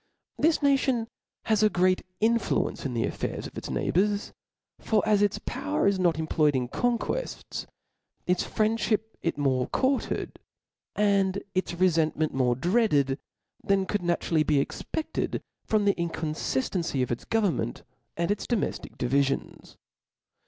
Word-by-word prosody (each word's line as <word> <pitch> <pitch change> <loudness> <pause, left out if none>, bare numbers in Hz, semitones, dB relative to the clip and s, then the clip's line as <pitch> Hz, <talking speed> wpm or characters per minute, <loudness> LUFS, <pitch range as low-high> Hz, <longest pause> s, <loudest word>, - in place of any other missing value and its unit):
This 315 -1 +3
nation 265 -4 +2 0.4
has 220 -2 +2
a 215 - +5
great 185 -1 +2 0.2
influence 225 -9 +1
in 125 - -5
the 115 - +1
affairs - - -3
of - - -9
its - - -6
neighbours; 205 +3 0 0.5
for 215 -3 +1
as 210 -1 +4
its 205 -1 +2
power 95 +1 -1
is 200 -1 +3
not 175 -4 +2
employed 155 -2 +2
in 125 -2 -1
conquefts, 245 - -2 0.6
its 180 0 +2
friendfliip 215 -1 +1 0.2
is 165 - -1
more 130 -3 +1
courted, 265 0 -1 0.6
and 200 -2 +2
its 185 -1 -1
refentment 160 -3 +2
more 125 -2 +2
dreaded, 150 - +2 0.4
than 195 -1 +2
could 205 0 -1
naturally 170 -2 +1
be 150 -2 +3
expeded 310 - -3 0.3
from 215 -2 +2
the 200 - +4
inconftancy 160 -3 -1
of 125 - -3
its 120 - -3
govemmenr, 200 - 0 0.3
and 170 +3 +1
its 205 - -2
domeftic 235 -4 -2
divifions. 135 +2 -1
185 Hz, 135 wpm, -27 LUFS, 150-215 Hz, 0.6 s, a